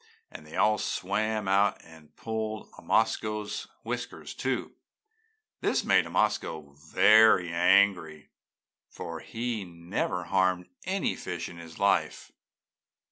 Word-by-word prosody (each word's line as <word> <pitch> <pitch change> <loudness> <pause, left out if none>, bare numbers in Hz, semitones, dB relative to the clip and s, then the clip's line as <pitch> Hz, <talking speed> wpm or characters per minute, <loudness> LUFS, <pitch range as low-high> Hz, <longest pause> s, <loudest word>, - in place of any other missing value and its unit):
and 75 - -11
they 75 - -10
all 110 0 +3
swam 105 +2 -1
out 100 +2 +3
and 80 -2 -17
pulled 110 -1 -4
Omasko's 105 -1 -1 0.2
whiskers, - - -5
too. - - -2 0.9
This - - 0
made - - +3
Omasko 80 -9 -1 0.2
very 105 -5 +6
angry, 85 -4 +2 0.6
for 85 -1 -7
he 115 0 -4
never 90 +1 -3
harmed 95 0 +1 0.2
any 190 +2 -1
fish 85 -1 -5
in 85 - -11
his 80 -1 -11
life. 100 0 0
95 Hz, 110 wpm, -28 LUFS, 85-110 Hz, 0.9 s, very